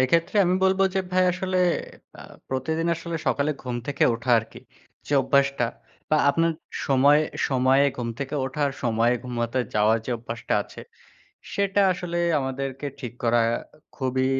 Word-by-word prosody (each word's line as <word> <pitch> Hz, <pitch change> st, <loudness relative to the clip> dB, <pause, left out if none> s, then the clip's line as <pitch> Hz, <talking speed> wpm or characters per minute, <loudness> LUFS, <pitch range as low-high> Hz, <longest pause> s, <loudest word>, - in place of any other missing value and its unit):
এক্ষেত্রে 165 Hz, +9 st, +2 dB
আমি 180 Hz, +1 st, +2 dB
বলব 190 Hz, 0 st, +3 dB
যে 190 Hz, -, +2 dB
ভাই 185 Hz, 0 st, +4 dB
আসলে 185 Hz, +1 st, -2 dB, 0.6 s
এ্যাঁ -, -, -12 dB, 0.2 s
প্রতিদিন 160 Hz, +6 st, -1 dB
আসলে 165 Hz, 0 st, -5 dB
সকালে 145 Hz, +1 st, +1 dB
ঘুম 125 Hz, -2 st, -3 dB
থেকে 140 Hz, 0 st, +1 dB
ওঠা 120 Hz, +2 st, -4 dB
আরকি। 110 Hz, -, -8 dB, 0.5 s
যে -, -, -4 dB
অভ্যাসটা 140 Hz, -3 st, +2 dB, 0.4 s
বা 155 Hz, -, +4 dB
আপনার 165 Hz, +3 st, +1 dB, 0.3 s
সময়ে, 140 Hz, +3 st, +5 dB, 0.3 s
সময়ে, 130 Hz, +1 st, +3 dB
ঘুম 120 Hz, -2 st, -3 dB
থেকে 140 Hz, +1 st, -4 dB
ওঠার 140 Hz, +2 st, -1 dB
সময়ে 120 Hz, 0 st, +2 dB
ঘুমাতে 120 Hz, 0 st, -2 dB, 0.2 s
যাওয়ার 110 Hz, +2 st, +3 dB
যে -, -, -3 dB
অভ্যাসটা 115 Hz, 0 st, -4 dB
আছে, -, -, -12 dB, 0.7 s
সেটা 200 Hz, 0 st, +1 dB
আসলে 175 Hz, -1 st, -4 dB, 0.2 s
আমাদেরকে 135 Hz, +1 st, -4 dB
ঠিক 125 Hz, -4 st, -6 dB
করা 120 Hz, 0 st, +3 dB, 0.6 s
খুবই 130 Hz, -1 st, 0 dB
135 Hz, 145 wpm, -25 LUFS, 125-165 Hz, 0.7 s, সময়ে